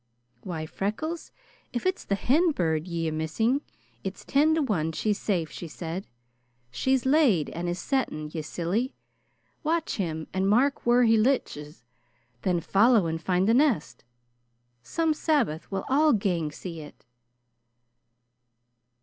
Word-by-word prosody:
"Why, 160 -2 -5
Freckles, 260 - -4 0.4
if 240 - -4
it's 370 0 0
the 200 - 0
hen 310 - +2
bird 160 - 0
ye 165 -2 -2
are - - -1
missing, 190 - 0 0.4
it's 190 0 -6
ten 305 +3 +3
to 320 - +1
one 165 - -1
she's 210 +4 0
safe," 175 -6 -1
she 170 - -7
said. 170 +4 -6 0.6
"She's 260 - +1
laid, 265 - +3
and 175 +1 -3
is 175 - -2
setting, 170 - -2
ye 160 - -3
silly! 180 +11 -2 0.7
Watch 325 +1 -1
him 160 -5 -2
and 190 +1 +1
mark 255 +5 +2
whaur 245 +1 +5
he 225 -1 +5
lichts. 150 - -1 0.6
Then 175 -2 +1
follow 215 +2 +4
and 165 0 -2
find 180 +2 +1
the 225 - +4
nest. 230 - +1 0.8
Some 320 - 0
Sabbath 280 - 0
we'll 195 -1 -2
all 295 +3 +4
gang 175 -7 0
see 165 +2 -7
it." 150 -4 -12
195 Hz, 140 wpm, -27 LUFS, 165-265 Hz, 0.8 s, whaur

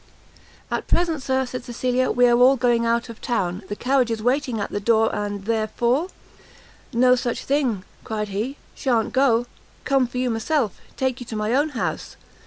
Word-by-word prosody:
"At - - -2
present, 335 -4 +1
Sir," 265 0 0
said 250 0 -6
Cecilia, 250 +1 0
"we 245 0 +4
are 240 - +5
all 255 +2 +7
going 240 -2 +2
out 235 +1 +1
of 230 -2 -11
town; 190 -6 -1
the 205 - -3
carriage 255 +1 +1
is 225 -2 -3
waiting 250 -2 0
at 205 - -3
the 205 - -2
door, 225 +1 +2
and 205 -1 -3
therefore 235 - 0 0.5
" - - -24 0.2
"No 250 +2 +5
such 240 -1 -3
thing," 260 -9 0 0.2
cried 210 -1 -3
he; 220 +8 -3 0.2
"Sha'n't 235 -3 0
go; 250 -3 +3 0.4
come 270 -3 +3
for 245 - -7
you 250 -1 0
myself; 225 - -1 0.2
take 260 -1 -1
you 245 - -8
to 225 - -5
my 215 +2 -1
own 290 +4 +2
house. - - -3
240 Hz, 190 wpm, -23 LUFS, 225-260 Hz, 0.5 s, all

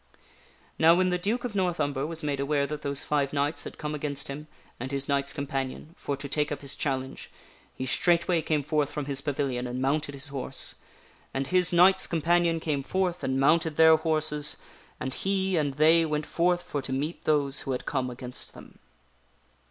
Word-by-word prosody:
Now, 165 +1 +7
when 185 +1 +2
the 180 0 0
Duke 220 +7 -1
of 245 -3 -4
North 180 -4 0
Umber 145 -1 -1
was 165 0 -4
made 145 -2 -1
aware 140 0 +1
that 150 +1 -5
those 140 0 +2
five 145 -2 0
knights 145 +2 0
had - - -8
come 150 -1 -4
against 145 -2 -3
him 150 +2 -6 0.3
and 130 +3 -5
his 140 0 -2
knights 140 -1 +1
companion 140 +1 -4
for 140 - -4
to 140 - -6
take 150 +1 -1
up 145 - -4
his 140 -1 -3
challenge, 135 -2 -3 0.5
he 130 - -4
straightway 170 +4 +2
came 155 -2 0
forth 150 0 0
from 145 -1 -4
his 140 -1 +1
pavilion 135 -4 -2
and 125 +1 -4
mounted 140 +2 0
his 140 +2 -2
horse. 135 -2 -2 0.6
And 135 0 -1
his 180 -1 +4
knights 185 +2 +5
companion 170 0 +2
came 150 -3 -1
forth 180 +4 -1
and 130 0 0
mounted 160 +2 +3
their 160 0 +7
horses, 155 -2 0 0.4
and 130 0 -3
he 190 +1 0
and 145 -4 0
they 160 +3 +5
went 150 -1 -1
forth 175 +2 +1
for 150 -5 -3
to 130 - -6
meet 145 +6 -3
those 140 -3 +1
who 135 - -4
had 125 - -3
come 130 -3 -1
against 125 0 -8
them. - - -14
150 Hz, 195 wpm, -27 LUFS, 140-165 Hz, 0.6 s, Now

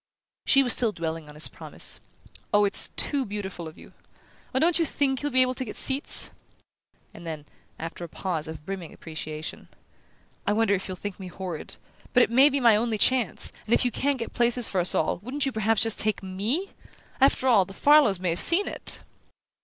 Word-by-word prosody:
She 275 -1 +5
was 245 - +5
still 235 -3 +2
dwelling 165 -4 -5
on 150 - -13
his 150 - +2
promise, - - -4 0.5
"It's 205 -1 +2
too 280 -2 0
beautiful 195 -6 -6
of 155 - -12
you! - - -15 0.6
Oh, 260 - -2
don't 330 +5 +3
you - - +3
THINK 275 -4 -1
you'll 290 0 -2
be 255 0 +5
able 255 0 -1
to 260 - -5
get 220 - -8
seats?" 270 +1 +1 0.8
And 170 - -11
then, 155 -2 -6 0.3
after 165 +2 -7
a 170 - -7
pause 165 -4 -4
of 155 -1 -9
brimming 185 -4 -7
appreciation: 155 -1 -7 0.8
"I - - +2
wonder 220 -1 +2
if 195 -1 -2
you'll 185 -1 -6
think 205 0 -7
me 190 - -7
horrid? 180 -3 -6 0.4
but 250 -2 +6
it - - -1
may 265 +4 +6
be 280 0 -1
my 235 -4 +5
only 220 0 0
chance; 255 +3 +1
and 225 - +3
if - - +1
you 245 - +1
can't 280 +4 -1
get 230 - -6
places 240 -1 +3
for 185 - 0
us 175 - +5
all, - - 0
wouldn't 260 +6 -3
you 270 - -1
perhaps 220 -1 +1
just 225 -1 +2
take 215 -2 +1
ME? 215 - -3 0.5
After 265 -1 +3
all, 215 -7 +5
the 195 - -13
Farlows 285 -10 +4
may 185 -1 -1
have 170 - -1
seen 375 +4 +7
it!" - - -2
215 Hz, 205 wpm, -25 LUFS, 180-260 Hz, 0.8 s, seen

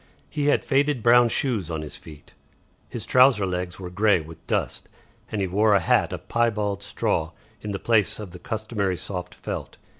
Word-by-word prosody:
He 145 -2 -1
had 145 - +2
faded 140 -3 +1
brown 120 0 +6
shoes 110 - -1
on 80 -2 -3
his 75 - -8
feet, 75 -2 -14 0.6
his - - -6
trouser 125 -5 +5
legs 90 -1 -3
were 90 -2 -7
grey 105 0 +3
with 80 0 -12
dust, - - -2 0.4
and 105 - -2
he - - +1
wore 105 +3 +3
a - - +5
hat 85 - +2
of - - -7
piebald 105 -4 0
straw - - -1 0.3
in 105 - -5
the 100 - -2
place 110 -2 +2
of 105 -4 -8
the 90 - -10
customary 110 -4 -2
soft 90 -1 -6
felt. - - -6
105 Hz, 185 wpm, -24 LUFS, 90-115 Hz, 0.6 s, brown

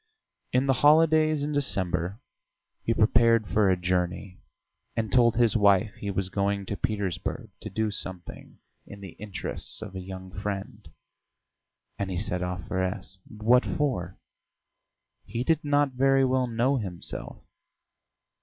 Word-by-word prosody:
In 130 +2 +2
the 135 - +3
holidays 155 0 +5
in 150 - -2
December 100 - -1 0.6
he - - -1
prepared 115 -1 +4
for 105 -1 +3
a 95 - +3
journey, 90 +1 -2 0.6
and 110 -3 -2
told 120 0 +4
his 120 -1 +3
wife 100 0 +4
he 100 - -6
was 95 -1 -1
going 100 0 -1
to 100 - -4
Petersburg 100 -6 -3
to - - -6
do 110 -1 -1
something 90 -3 -8 0.3
in 100 -1 -11
the 95 -3 -8
interests 100 -3 -4
of - - -5
a - - -4
young 95 0 -8
friend 100 0 -5 1.1
and 100 -1 -2
he 90 - -3
set 90 -2 -2
off 90 0 -4
for 95 - -1
S. 95 +1 -4
What 115 +4 +3
for? 95 - -2 1.1
He 115 +4 -3
did 160 +3 +1
not 145 -1 +2
very 135 +1 +3
well 130 -1 +1
know 120 +4 +1
himself. 95 -7 -5
105 Hz, 145 wpm, -27 LUFS, 95-125 Hz, 1.1 s, holidays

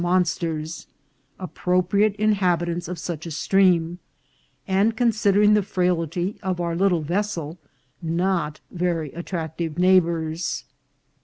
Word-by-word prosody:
375 175 -2 +1
monsters, 155 +2 -7 0.5
appropriate 185 +3 +1
inhabitants 175 -5 +1
of 180 +1 -5
such 165 0 -5
a - - -4
stream, 175 0 +2 0.7
and, 200 +4 +2
considering 210 -3 +3
the 210 - +4
frailty 180 0 -1
of 185 -2 -2
our 170 -1 -1
little 180 -2 +2
vessel, 170 -2 -2 0.4
not 170 -2 -1
very 170 -4 -2
at 170 +1 -7
tractive 160 -2 -4
neighbours. 170 -3 +1
175 Hz, 110 wpm, -23 LUFS, 165-190 Hz, 0.7 s, the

